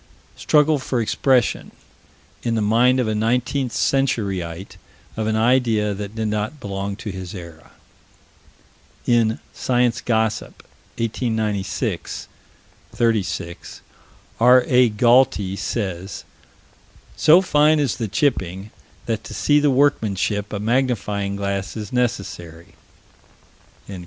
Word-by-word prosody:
Struggle 150 0 +3
for 130 -1 -2
expression, 125 +2 +1 0.7
in 115 -1 -1
the 110 - 0
mind 120 +5 +3
of 125 - 0
a 110 - 0
19th 125 +4 0
century 115 -9 0
ite, 85 +3 -9 0.4
of 110 -1 -2
an 110 - 0
idea 110 -3 +2
that 100 +1 -7
did 110 -1 -2
not 105 +7 -3
belong 100 -2 -4
to 105 0 -6
his 95 0 -7
era: 85 -3 -11 1.4
In 115 -2 +2 0.2
Science 120 -1 0
Gossip, 110 -2 -1 0.3
1896 110 -5 -2 0.6
36, 100 -7 -2 0.6
R.A. 125 +1 +5
Galty 110 -3 +3
says: 95 -3 -4 0.9
"So 160 +4 +6
fine 150 -3 +3
is 140 -5 0
the 115 -2 -2
chipping 100 - -1 0.3
that 110 -2 -2
to - - -8
see 145 0 +3
the 145 0 +3
workmanship 105 -7 +1
a 105 - -3
magnifying 105 -4 -1
glass 100 0 -3
is 105 0 -7
necessary." 100 -9 -3
110 Hz, 110 wpm, -21 LUFS, 100-125 Hz, 1.4 s, So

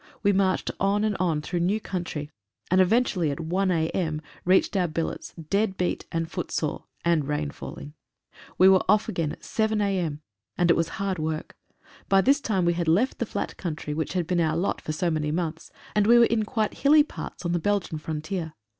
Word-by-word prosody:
We 200 -1 +4
marched 190 -1 +1
on 200 +2 +2
and 215 -2 +1
on 165 -4 0
through 175 +3 -2
new 190 +5 +1
country, 170 -7 -5 0.4
and 185 +1 +5
eventually 185 -4 +2
at 140 - -3
1 185 +4 0
a.m., 160 -2 0 0.3
reached 190 +3 +3
our 180 -2 +2
billets, 165 0 -4
dead 195 +5 -1
beat 180 - -1
and 165 0 -1
foot 175 +1 -5
sore, 155 - -2 0.2
and 165 -5 +2
rain 145 - -1
falling. 70 +2 -9 0.6
We 185 - +7
were 190 -1 +6
off 215 0 +4
again 165 -4 -1
at - - -10
7 220 -1 0
a.m., 180 -7 -1 0.4
and 175 -1 +4
it - - +5
was 165 -1 0
hard 195 -4 -2
work. 155 0 -3 0.5
By 195 0 +5
this 280 +6 +3
time 195 -8 0
we 170 - +3
had 170 -1 -2
left 205 +12 +2
the 235 - -1
flat - - -4
country 155 -4 -4
which 160 +2 -2
had 180 -2 0
been 175 +1 +1
our 160 -1 +1
lot 185 +4 -1
for - - -4
so 170 +3 0
many 155 -1 -1
months, 160 0 -3 0.3
and 210 -1 +3
we 240 +1 +7
were 235 - +7
in 225 -2 +1
quite 215 -1 -2
hilly 295 +2 +6
parts 290 - -8
on 170 - 0
the 175 - +1
Belgian 195 -3 -1
frontier. 160 +2 -4
175 Hz, 210 wpm, -26 LUFS, 160-200 Hz, 0.6 s, We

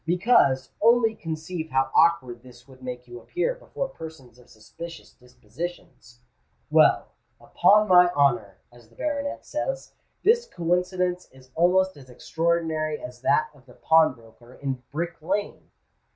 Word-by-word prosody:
Because, 165 - +2
only 230 0 +4
conceive 160 -2 -6
how 135 -1 0
awkward 130 -8 +3
this 125 0 -17
would 130 -1 -17
make 125 -1 -7
you 120 0 -10
appear 360 - -2
before - - -5
persons 140 - -12
of 125 - -20
suspicious 165 +10 -11
dispositions. 125 -2 -10 0.5
Well—upon 210 +1 +2
my 180 -2 +7
honour, 120 - +1
as 120 -2 -19
the 115 - -24
baronet 285 -1 -3
says—this 485 -2 -2
coincidence 180 - -1
is 130 0 -19
almost 185 +2 +2
as 130 -2 -15
extraordinary 160 +2 -1
as 125 -1 -10
that 165 +2 +2
of 135 -2 -22
the 125 - -16
pawnbroker 125 -6 +1
in 135 -2 -4
Brick 170 +3 -4
Lane." 200 +6 -3
160 Hz, 130 wpm, -25 LUFS, 130-180 Hz, 0.5 s, my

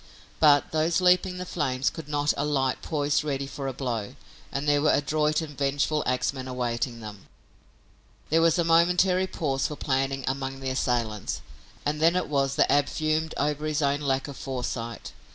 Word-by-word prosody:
But 145 -2 +5
those 160 +2 +2
leaping 180 0 +3
the 180 - -4
flames 135 -6 -1
could 160 -3 -8
not 145 0 +1
alight 140 -3 0
poised 145 -2 0
ready 140 -2 -2
for 135 0 -6
a - - -1
blow, 120 -6 -4 0.4
and 140 +2 -3
there 145 0 +3
were 150 - +4
adroit 150 +2 +1
and 150 -2 -8
vengeful 145 +2 0
axmen 130 +1 -1
awaiting 120 -1 -2
them. 105 -2 -10 1.0
There 165 +1 +4
was 165 0 +4
a 170 - +3
momentary 180 +3 +3
pause 135 -6 -1
for 150 - -6
planning 135 -1 -1
among 135 0 -3
the 135 -1 -3
assailants, 120 -5 -1 0.4
and 150 +1 -1
then 165 +2 +4
it 180 - 0
was 135 -2 +1
that - - +3
Ab 145 0 +4
fumed 155 0 -1
over 150 +1 -1
his 155 0 0
own 140 0 +2
lack 135 -1 0
of 140 - -8
foresight. 120 -3 -4
145 Hz, 175 wpm, -26 LUFS, 135-155 Hz, 1.0 s, But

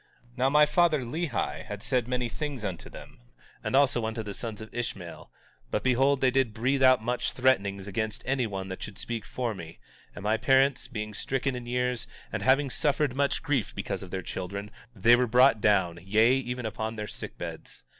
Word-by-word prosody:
18:17 - - -26
Now 130 +2 +3
my 150 +2 +6
father, 155 -1 +3
Lehi, 145 +3 -2
had 105 -1 -7
said 125 -3 0
many 125 -1 -1
things 135 -1 -4
unto 95 -4 -5
them, - - -12 0.4
and - - -1
also 135 -4 +4
unto 110 0 -4
the 105 -1 -6
sons 110 0 -5
of 110 0 -10
Ishmael; 100 -8 -5 0.4
but, - - -1
behold, 135 +2 +3
they 130 - +4
did 130 -4 +1
breathe 130 +4 +1
out 130 -3 +6
much 125 +1 -1
threatenings 100 -7 +1
against 110 +2 -3
anyone 110 -8 -1
that 95 - -6
should 105 -2 -7
speak 115 -2 -4
for 120 -3 -2
me; 85 -4 -9 0.4
and 100 - -8
my 110 +2 +2
parents 135 +1 +3
being 105 -4 -5
stricken 135 +4 -1
in 120 -1 -7
years, 125 -1 -1 0.3
and - - -2
having 135 +1 +3
suffered 145 -2 +1
much 140 0 0
grief 140 -9 0
because - - -3
of - - -8
their 95 -1 -4
children, 100 +3 -5 0.2
they 115 +4 +6
were 125 0 +2
brought 125 -1 +5
down, 95 -5 +2
yea, 110 +6 +4
even 125 -2 -2
upon 110 +1 -3
their 105 -1 -4
sick - - -7
beds. - - -7
120 Hz, 195 wpm, -28 LUFS, 105-130 Hz, 0.4 s, my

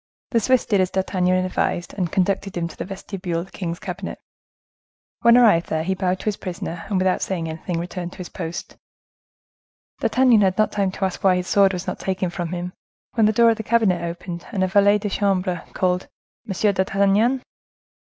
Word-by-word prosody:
The 230 - +3
Swiss 255 +2 +2
did 200 -4 +2
as 185 - +1
D'Artagnan 185 -1 +1
advised, 175 -1 -1
and 180 -5 -2
conducted 195 0 0
him 170 -1 -1
to 165 - -11
the - - -5
vestibule 190 -2 -4
of - - -7
the 190 - -21
king's 170 -3 -4
cabinet. - - -6 1.0
When 235 0 +6
arrived 210 -9 +5
there, 160 0 -1
he 190 +3 0
bowed 185 -1 0
to - - -11
his 210 -2 0
prisoner, 175 -2 -6
and, 200 - +1
without 185 0 +1
saying 170 -4 -2
anything, 165 +2 -4
returned 175 0 -5
to - - -14
his 180 - -6
post. 170 -1 -6 1.2
D'Artagnan 250 -4 +4
had 190 -2 +2
not 215 - +3
had - - -10
time 200 -2 +1
to 195 - -1
ask 190 - -4
why 190 -2 +5
his 180 0 -2
sword 200 -1 +4
was 180 0 -4
not - - -4
taken 190 -2 -2
from 175 -1 -4
him, 180 +1 -4 0.4
when 225 -3 +4
the - - +4
door 230 +1 +5
of 225 - -1
the - - -3
cabinet 220 -6 +2
opened, 170 0 -6
and 195 -5 0
a - - +2
valet 205 +2 +4
de 210 0 -3
chambre 185 -4 0
called, 180 0 0 0.4
"M. 200 +2 +1
d'Artagnan!" 200 +6 +2
190 Hz, 205 wpm, -22 LUFS, 180-205 Hz, 1.2 s, When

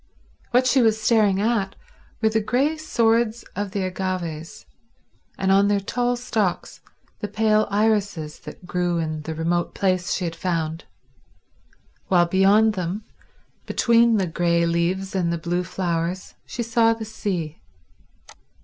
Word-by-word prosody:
What 250 +1 +3
she 255 +1 +4
was 220 -2 +3
staring 215 -4 +3
at 210 -2 0 0.5
were 220 - +5
the 220 0 +1
grey 265 +8 +1
swords 235 -6 +1
of 205 +1 -2
the 195 0 -2
agaves, 180 -4 -4 0.7
and, 190 0 +1
on 200 +1 +5
their 205 0 +2
tall 245 +5 -1
stalks, 220 -6 -2 0.4
the 210 - -3
pale 215 +1 +2
irises 200 -7 0
that - - -11
grew 175 -1 -1
in 155 -2 -2
the 160 +1 -5
remote 170 +2 -1
place 185 -2 0
she 185 - -2
had 165 -1 -4
found, 165 -2 -2 1.2
while 175 -2 +4
beyond 195 +5 +4
them, 185 +2 -3 0.6
between 235 -1 +3
the 195 - +1
grey 170 0 +1
leaves 175 +3 -1
and 180 -3 0
the 170 - -1
blue 175 +2 -2
flowers, 175 0 -3
she 240 - -4
saw 230 0 +3
the 225 -1 -6
sea. 180 -7 -4
195 Hz, 140 wpm, -23 LUFS, 175-220 Hz, 1.2 s, were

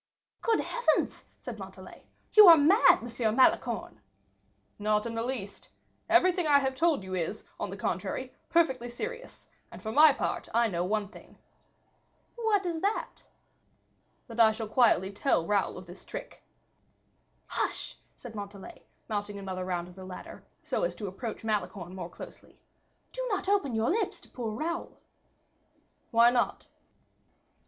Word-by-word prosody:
"Good 455 -1 +2
heavens!" 485 0 0
said - - -7
Montalais; - - -11 0.3
"you 425 -2 +10
are 335 -1 +11
mad, 345 +10 +5
M. 225 -2 -1
Malicorne." 260 - +2 0.8
"Not 210 +1 +1
in 230 - -4
the 230 - -2
least. 230 -5 -5 0.4
Everything 355 0 +4
I 290 -1 +6
have 265 -1 0
told 305 - +1
you 190 0 -7
is, 185 +4 -3 0.2
on - - -3
the - - -7
contrary, - - -3 0.2
perfectly 265 -8 +2
serious; 480 - -7 0.2
and, - - -10
for 220 - -5
my 305 +6 +8
own 280 - +1
part, - - -3
I 235 -1 +4
know 175 -3 -1
one 205 +2 -1
thing." - - -15 1.0
"What 440 -5 +1
is 335 -2 -2
that?" 405 +2 -2 1.0
"That 235 -1 -9
I 220 -1 +7
shall 220 0 -5
quietly 215 -4 +3
tell 200 -4 +1
Raoul 200 -2 0
of 185 - -9
the 175 - -10
trick." 190 - -9 1.0
"Hush!" - - -3 0.2
said 245 -3 -10
Montalais, 200 -2 -9 0.3
mounting 205 -2 -3
another 190 -2 -5
round 175 -1 -2
of 180 - -13
the 190 +1 -11
ladder, 185 -1 -9 0.2
so - - -2
as - - -1
to 210 - -6
approach 210 +5 -6
Malicorne 200 -4 -3
more 180 -2 -6
closely, - - -12 0.5
"do - - -3
not 390 -2 -2
open 385 - +1
your 220 +5 +1
lips 440 +5 -1
to - - -18
poor 235 -3 -4
Raoul." 335 +7 -4 1.1
"Why 235 0 +6
not?" 245 -1 -1
230 Hz, 155 wpm, -29 LUFS, 200-325 Hz, 1.1 s, are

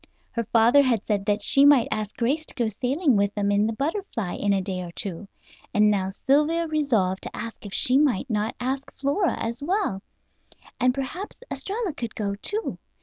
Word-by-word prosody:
Her 230 -1 -2
father 235 +5 +5
had 245 -6 +1
said 205 -2 -1
that 205 0 +1
she 275 +5 +5
might 285 -4 +6
ask 215 -1 -3
Grace 275 +7 0
to - - -8
go 235 -3 0
sailing 260 - +1
with 200 0 +1
them 205 -1 0
in 205 +1 +3
the 225 - -1
Butterfly 275 - -3
in 205 - 0
a 195 - +3
day 185 -1 -3
or 175 -1 -7
two; 195 +1 -5 0.5
and 210 0 +5
now 190 -2 0
Sylvia 300 +10 +1
resolved 245 - +1
to - - -7
ask 225 -2 -7
if 195 - -10
she 255 +2 +4
might 275 -10 +2
not 220 -1 -1
ask 265 +2 -3
Flora 285 +7 +1
as 230 +4 -3
well, 345 - -1 0.8
and 255 0 +4
perhaps 320 - -5
Estralla 405 -3 -2
could 235 -5 -6
go, 200 -2 -2
too. 415 - -3
235 Hz, 195 wpm, -25 LUFS, 205-285 Hz, 0.8 s, might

